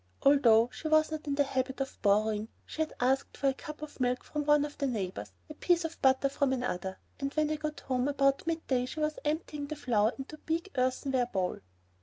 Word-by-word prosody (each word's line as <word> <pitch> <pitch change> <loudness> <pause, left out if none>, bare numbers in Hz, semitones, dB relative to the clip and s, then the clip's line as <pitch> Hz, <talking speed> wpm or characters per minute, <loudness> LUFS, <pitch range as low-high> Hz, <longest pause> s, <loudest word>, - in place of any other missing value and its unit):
Although 245 -4 +5
she 315 - -5
was 310 0 +4
not 310 -1 -5
in 280 - 0
the 285 - +4
habit 265 -1 -2
of 270 -1 -4
borrowing, 210 +1 +2 0.2
she 315 - -5
had 315 - -1
asked 260 +2 +1
for 275 - +2
a - - 0
cup 300 +2 -9
of 305 - -9
milk 250 0 0
from 300 -1 -3
one 295 0 +4
of 290 - -8
the 280 - +1
neighbors, 185 - -3 0.2
a - - -8
piece 350 -1 +2
of 325 - -6
butter 265 +1 +4
from 275 0 0
another, 190 -7 -3 0.2
and 275 0 -2
when 305 -1 +2
I - - +1
got 305 0 -4
home 255 0 0
about 275 +1 +2
midday 270 -7 0
she 310 - -6
was 305 0 -1
emptying 300 -1 -2
the 305 - -4
flour 230 -6 +2
into 275 +3 -7
a - - -30
big 335 +4 -2
earthenware 255 0 +1
bowl. 190 -6 -2
275 Hz, 225 wpm, -31 LUFS, 250-305 Hz, 0.2 s, Although